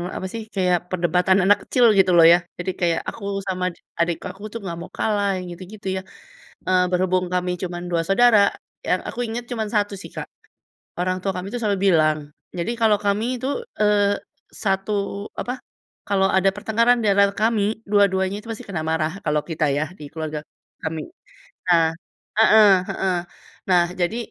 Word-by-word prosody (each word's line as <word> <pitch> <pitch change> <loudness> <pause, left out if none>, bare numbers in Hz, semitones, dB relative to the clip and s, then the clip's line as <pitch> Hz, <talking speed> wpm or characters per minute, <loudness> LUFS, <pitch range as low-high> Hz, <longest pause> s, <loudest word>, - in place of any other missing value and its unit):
apa 190 - -4
sih 225 - -4
kayak, 180 -2 +3
perdebatan 180 +1 +2
anak 205 +1 +6
kecil 245 -2 +3
gitu 190 -1 +5
loh 165 - +8
ya, - - +6 0.2
jadi 180 +1 -2
kayak 170 -1 +2
aku 220 - -10 0.2
sama 185 -1 -1
dik - - -26 0.2
adik 170 0 +1
aku 190 +2 -17
tuh 230 - -4
nggak 170 -3 -5
mau 175 - -9
kalah 205 -2 +1
yang 180 - -5
gitu-gitu 190 +3 -10
ya. - - -3 0.7
Eee, 185 0 +3
berhubung 185 0 +1
kami 180 0 0
cuman 175 -1 -4
2 170 -1 +1
saudara, 225 +2 +5 0.5
yang - - +2
aku - - -7
inget 235 +2 -4
cuman 220 -3 -2
1 205 -1 +1
sih - - -10
Kak, - - -4 0.7
orang 185 +1 0
tua 195 +1 -1
kami 180 +1 -4
tuh 245 - -2
selalu 200 -2 +1
bilang 155 -2 +3 0.4
jadi 175 +6 -2
kalo 220 -2 +4
kami 215 +5 +1
itu, 255 +2 -4 0.3
eee, 205 -1 +3 0.5
satu 195 +1 0 0.5
apa, 245 - -3 0.5
kalo 200 -1 +2
ada 190 +1 +4
pertengkaran 230 +4 +2
diantara 200 -1 +4
kami, 220 0 0
dua-duanya 195 -2 +2
itu 220 - -14
masih 220 - -7
kena 175 -5 -3
marah 160 -1 0
kalo 150 -1 +2
kita 160 -1 0
ya, 150 - +1 0.2
di 150 - -8
keluarga 155 -1 -4 0.4
kami. 160 0 -3 0.7
Nah 165 -2 +5 0.5
heeh 215 -1 +6 0.2
heeh. 190 -1 0 0.6
Nah 180 -1 +6 0.2
jadi 175 +6 0
190 Hz, 175 wpm, -22 LUFS, 175-210 Hz, 0.7 s, loh